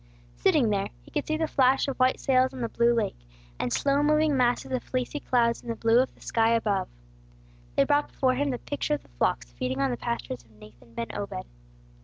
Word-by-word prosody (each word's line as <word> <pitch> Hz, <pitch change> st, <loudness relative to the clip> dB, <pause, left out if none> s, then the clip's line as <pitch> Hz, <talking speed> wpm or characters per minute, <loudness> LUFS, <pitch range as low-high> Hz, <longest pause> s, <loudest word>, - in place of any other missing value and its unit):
Sitting 210 Hz, -, +3 dB
there, 200 Hz, -1 st, 0 dB
he -, -, -18 dB
could 295 Hz, -, -2 dB
see 310 Hz, -, 0 dB
the 320 Hz, -, +1 dB
flash 270 Hz, -2 st, +3 dB
of 275 Hz, -, -2 dB
white 255 Hz, 0 st, +3 dB
sails 260 Hz, -1 st, +2 dB
on 255 Hz, -, -6 dB
the 230 Hz, -, -1 dB
blue 235 Hz, +1 st, +3 dB
lake, 230 Hz, -, -1 dB, 0.4 s
and 120 Hz, -, -1 dB
slow 280 Hz, -, +2 dB
moving 305 Hz, 0 st, +3 dB
masses 245 Hz, 0 st, +1 dB
of 255 Hz, -2 st, 0 dB
fleecy 255 Hz, +3 st, -3 dB
clouds 235 Hz, -4 st, +1 dB
in -, -, -15 dB
the 230 Hz, -, -1 dB
blue 230 Hz, +1 st, +3 dB
of 260 Hz, -, 0 dB
the -, -, -24 dB
sky 230 Hz, 0 st, +2 dB
above. 205 Hz, -4 st, 0 dB, 0.9 s
They -, -, +5 dB
brought 290 Hz, 0 st, +2 dB
before 260 Hz, -2 st, +1 dB
him 285 Hz, +3 st, 0 dB
the 250 Hz, -, -1 dB
picture 280 Hz, -, -2 dB
of 145 Hz, -, -9 dB
the -, -, -23 dB
flocks -, -, -1 dB
feeding 125 Hz, -, -3 dB
on 135 Hz, -1 st, +1 dB
the 120 Hz, -, -2 dB
pastures 130 Hz, -, -4 dB
of 115 Hz, -, -26 dB
Nathan 110 Hz, +2 st, -17 dB
ben 115 Hz, -, -4 dB
Obed. -, -, -4 dB
240 Hz, 225 wpm, -27 LUFS, 185-265 Hz, 0.9 s, They